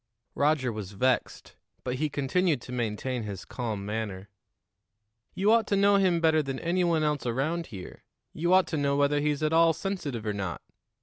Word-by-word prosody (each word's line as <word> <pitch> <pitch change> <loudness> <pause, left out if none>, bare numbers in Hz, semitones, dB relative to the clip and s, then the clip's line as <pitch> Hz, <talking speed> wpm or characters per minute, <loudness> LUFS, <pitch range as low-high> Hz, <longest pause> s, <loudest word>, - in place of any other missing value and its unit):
Roger 140 -4 +1
was 105 -2 -6
vexed, 125 +5 -1 0.3
but 125 0 -2
he 155 +2 0
continued 145 +3 +1
to 125 - -11
maintain 120 +1 -2
his 100 -4 -6
calm 110 -5 -4
manner. 105 -2 -4 1.1
"You 200 +3 +3
ought 230 0 +4
to 200 - +1
know 200 0 +5
him 185 -3 +3
better 160 -1 +3
than 135 -2 -4
any 175 +4 0
one 165 -3 +2
else 150 -4 0
around 155 +8 -1
here; 95 -6 -10 0.3
you 170 +3 -1
ought 185 0 +6
to 160 - -2
know 140 -1 +1
whether 145 +1 +2
he's 150 0 0
at 155 +1 +1
all 165 0 +5
sensitive 150 - -4
or 105 - -1
not. 95 -4 -4
145 Hz, 185 wpm, -28 LUFS, 115-165 Hz, 1.1 s, ought